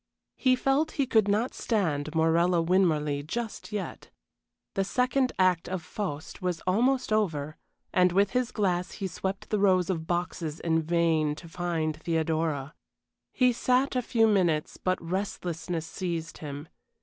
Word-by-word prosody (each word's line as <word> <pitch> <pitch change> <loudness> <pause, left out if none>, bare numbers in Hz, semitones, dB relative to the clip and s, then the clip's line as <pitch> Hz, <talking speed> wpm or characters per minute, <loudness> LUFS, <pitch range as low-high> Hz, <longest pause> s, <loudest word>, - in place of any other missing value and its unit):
He 255 -1 +3
felt 270 +4 +1
he 280 - +1
could 220 -5 +3
not 215 +5 +1
stand 160 -9 -1
Morella 170 +2 +3
Winmarleigh 165 -5 +2
just 230 +3 -4
yet. 210 -2 -5 0.6
The 195 - +1
second 250 +5 +1
act 185 -3 +2
of 185 -2 -3
"Faust" 170 -4 -5
was 180 -2 -1
almost 245 +6 +1
over, 155 -8 0 0.4
and 180 -1 +4
with 195 +2 +3
his 250 -1 0
glass 180 -4 0
he 200 - -5
swept 190 +1 -4
the 210 - +2
rows 185 -2 +3
of 160 -3 -4
boxes 175 -3 -2
in 165 -1 +1
vain 160 -2 +1
to 170 - -11
find 165 -2 -2
Theodora. 160 -3 -1 0.6
He 250 -1 +3
sat 255 +3 +1
a 250 - +2
few 230 -2 +3
minutes, 175 -7 +1
but 185 0 0
restlessness 170 -2 -3
seized 170 -2 -4
him. 145 0 -7
180 Hz, 150 wpm, -28 LUFS, 160-210 Hz, 0.6 s, and